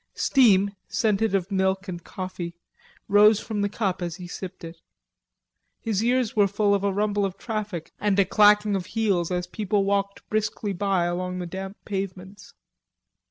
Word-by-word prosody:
Steam, 200 Hz, -6 st, +4 dB
scented 220 Hz, -3 st, +1 dB
of 190 Hz, +1 st, -1 dB
milk 190 Hz, 0 st, 0 dB
and 175 Hz, -2 st, -6 dB
coffee, 185 Hz, -2 st, -6 dB, 0.5 s
rose 210 Hz, +1 st, +6 dB
from 210 Hz, -2 st, -3 dB
the 205 Hz, -, +1 dB
cup 195 Hz, -3 st, -2 dB
as 170 Hz, -2 st, -3 dB
he 180 Hz, -1 st, -9 dB
sipped 185 Hz, +1 st, -8 dB
from 165 Hz, -, -7 dB
it. 165 Hz, 0 st, -21 dB, 1.0 s
His 220 Hz, -2 st, -1 dB
ears 245 Hz, -1 st, +1 dB
were 205 Hz, -2 st, +4 dB
full 205 Hz, +1 st, +1 dB
of 200 Hz, -1 st, +1 dB
a 200 Hz, -, +2 dB
rumble 205 Hz, +1 st, 0 dB
of 195 Hz, -2 st, -2 dB
traffic 210 Hz, -7 st, -5 dB
and 205 Hz, -2 st, +1 dB
a 200 Hz, -, +5 dB
clacking 210 Hz, +1 st, +4 dB
of 185 Hz, -2 st, -3 dB
heels 195 Hz, -7 st, +1 dB
as 180 Hz, -1 st, -1 dB
people 205 Hz, +2 st, -1 dB
walked 200 Hz, 0 st, -1 dB
briskly 215 Hz, -1 st, -2 dB
by 195 Hz, -1 st, +1 dB
along 180 Hz, +1 st, -2 dB
the 180 Hz, -, -4 dB
damp 190 Hz, +3 st, -6 dB
pavements. 195 Hz, 0 st, -6 dB
200 Hz, 170 wpm, -25 LUFS, 185-210 Hz, 1.0 s, rose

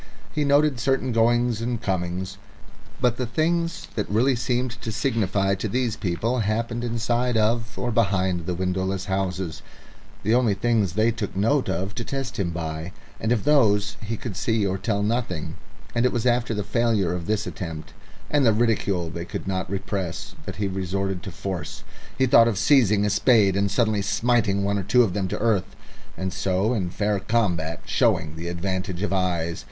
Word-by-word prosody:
He 150 Hz, -, +1 dB
noted 145 Hz, -2 st, +3 dB
certain 130 Hz, 0 st, +1 dB
goings 120 Hz, 0 st, +2 dB
and 120 Hz, 0 st, -2 dB
comings, 95 Hz, 0 st, -3 dB, 0.6 s
but 125 Hz, -2 st, +2 dB
the 125 Hz, -, -2 dB
things 165 Hz, +6 st, 0 dB
that 105 Hz, -, -2 dB
really 125 Hz, +6 st, +3 dB
seemed 120 Hz, 0 st, -2 dB
to 110 Hz, -, -3 dB
signify 100 Hz, -5 st, +1 dB
to 100 Hz, +3 st, -2 dB
these 120 Hz, 0 st, 0 dB
people 115 Hz, +6 st, -1 dB
happened 115 Hz, +2 st, -1 dB
inside 120 Hz, +1 st, 0 dB
of 115 Hz, +1 st, 0 dB
or 120 Hz, -, -1 dB
behind 95 Hz, -6 st, +1 dB
the 90 Hz, -, -1 dB
windowless 95 Hz, +1 st, -1 dB
houses 95 Hz, -4 st, -2 dB, 0.6 s
the 110 Hz, +3 st, +2 dB
only 120 Hz, -4 st, +3 dB
things 105 Hz, -3 st, +1 dB
they 110 Hz, +3 st, +3 dB
took 110 Hz, -4 st, -4 dB
note 115 Hz, +6 st, +2 dB
of 95 Hz, +3 st, -2 dB
to 120 Hz, -, -4 dB
test 135 Hz, -1 st, -4 dB
him 95 Hz, -3 st, 0 dB
by 80 Hz, 0 st, -4 dB, 0.3 s
and 110 Hz, -, -1 dB
of 120 Hz, -4 st, +1 dB
these 105 Hz, -8 st, +3 dB
he 110 Hz, +1 st, -3 dB
could 110 Hz, -4 st, -6 dB
see 110 Hz, +1 st, +1 dB
or 95 Hz, 0 st, -1 dB
tell 100 Hz, -1 st, 0 dB
nothing; 105 Hz, -8 st, -2 dB, 0.4 s
and 120 Hz, -, +1 dB
it 125 Hz, -, +3 dB
was 120 Hz, -1 st, -2 dB
after 120 Hz, -2 st, +2 dB
the 105 Hz, -, -1 dB
failure 110 Hz, -6 st, +1 dB
of 85 Hz, -2 st, -4 dB
this 110 Hz, 0 st, 0 dB
attempt, 80 Hz, -7 st, -6 dB, 0.3 s
and 145 Hz, -1 st, +2 dB
the 115 Hz, -, +5 dB
ridicule 105 Hz, -7 st, +1 dB
they 85 Hz, -, -5 dB
could 85 Hz, -, -6 dB
not 95 Hz, -2 st, -2 dB
repress, 95 Hz, -2 st, -4 dB
that 95 Hz, -, -4 dB
he 100 Hz, +1 st, -1 dB
resorted 95 Hz, 0 st, -2 dB
to 100 Hz, -, -6 dB
force. 85 Hz, -3 st, -5 dB, 0.3 s
He 130 Hz, -, +4 dB
thought 115 Hz, -3 st, +6 dB
of 110 Hz, -4 st, 0 dB
seizing 110 Hz, -5 st, +4 dB
a 105 Hz, -, +1 dB
spade 105 Hz, -2 st, +4 dB
and 100 Hz, 0 st, +1 dB
suddenly 110 Hz, -2 st, +1 dB
smiting 105 Hz, -1 st, +1 dB
one 100 Hz, 0 st, +1 dB
or -, -, -3 dB
two 120 Hz, +6 st, +4 dB
of 100 Hz, -6 st, -1 dB
them 95 Hz, -1 st, -1 dB
to -, -, -3 dB
earth, 105 Hz, -4 st, 0 dB, 0.4 s
and 95 Hz, -1 st, -3 dB
so 95 Hz, +5 st, +1 dB
in 95 Hz, -7 st, -1 dB
fair 105 Hz, +2 st, 0 dB
combat 90 Hz, -8 st, 0 dB
showing 75 Hz, -1 st, +1 dB
the 85 Hz, +2 st, -6 dB
advantage 95 Hz, +1 st, -3 dB
of 105 Hz, -, -1 dB
eyes. 85 Hz, -3 st, 0 dB
105 Hz, 185 wpm, -24 LUFS, 95-120 Hz, 0.6 s, thought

